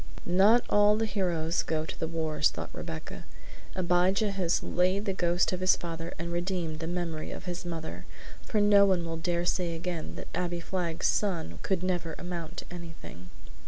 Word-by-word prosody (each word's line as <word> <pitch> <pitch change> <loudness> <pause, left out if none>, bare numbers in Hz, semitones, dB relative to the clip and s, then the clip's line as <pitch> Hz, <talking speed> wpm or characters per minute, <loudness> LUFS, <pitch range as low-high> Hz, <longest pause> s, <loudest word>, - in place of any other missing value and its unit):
"Not 200 +7 +5
all 205 0 +5
the 225 - +1
heroes 175 -5 0
go 155 -1 -1
to - - -7
the 160 - -1
wars," 160 -2 +1
thought - - -6
Rebecca. 80 - -6 0.5
"Abijah 185 +3 +2
has 185 -3 +1
laid 185 +3 +1
the 195 - 0
ghost 175 -1 +2
of 180 - -2
his 185 0 +5
father 165 0 -5
and 170 +1 -4
redeemed 175 -3 -2
the 165 - -3
memory 170 -3 -3
of - - -7
his 175 -1 -4
mother, 160 - -5 0.3
for 215 - -1
no 205 -1 +7
one 185 -4 +3
will 165 0 -3
dare 170 +1 0
say 175 -2 0
again 165 - -4
that - - -7
Abbie 175 0 -1
Flagg's 170 -2 -2
son 165 - 0
could 185 -2 0
never 175 -3 -1
amount 175 -2 -5
to - - -4
anything!" 165 - -9
175 Hz, 180 wpm, -29 LUFS, 165-185 Hz, 0.5 s, no